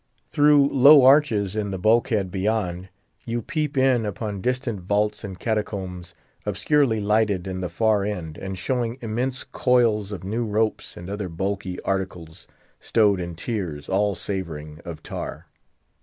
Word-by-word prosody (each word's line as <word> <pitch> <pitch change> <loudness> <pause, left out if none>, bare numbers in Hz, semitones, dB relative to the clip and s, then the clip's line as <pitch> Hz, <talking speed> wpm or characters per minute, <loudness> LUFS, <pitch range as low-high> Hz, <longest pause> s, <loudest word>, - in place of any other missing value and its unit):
Through 145 -2 +5
low 140 0 +7
arches 115 -8 +4
in 105 -2 -1
the 95 - -3
bulkhead 110 -1 +2
beyond, 95 -2 -1 0.3
you 120 0 -3
peep 155 -5 -2
in 130 -3 +3
upon 105 -1 -4
distant 125 -2 -1
vaults 105 +3 0
and 95 -2 -6
catacombs, 95 -6 -3 0.3
obscurely 140 -7 +1
lighted 105 -3 +1
in 95 -1 -4
the 90 - -3
far 105 +3 +2
end, 90 -7 -4
and 95 +1 -6
showing 120 +4 -2
immense 125 +3 -2
coils 115 -5 +1
of 100 -2 -6
new 110 +5 -2
ropes, 110 0 -1
and 85 - -8
other 100 -1 -4
bulky 95 +1 -3
articles, 90 -4 -4 0.3
stowed 105 -4 +2
in 85 -1 -5
tiers, 80 -7 -4
all 100 +1 +1
savouring 80 -6 -5
of 85 -4 -8
tar. - - -6
105 Hz, 145 wpm, -24 LUFS, 95-115 Hz, 0.3 s, low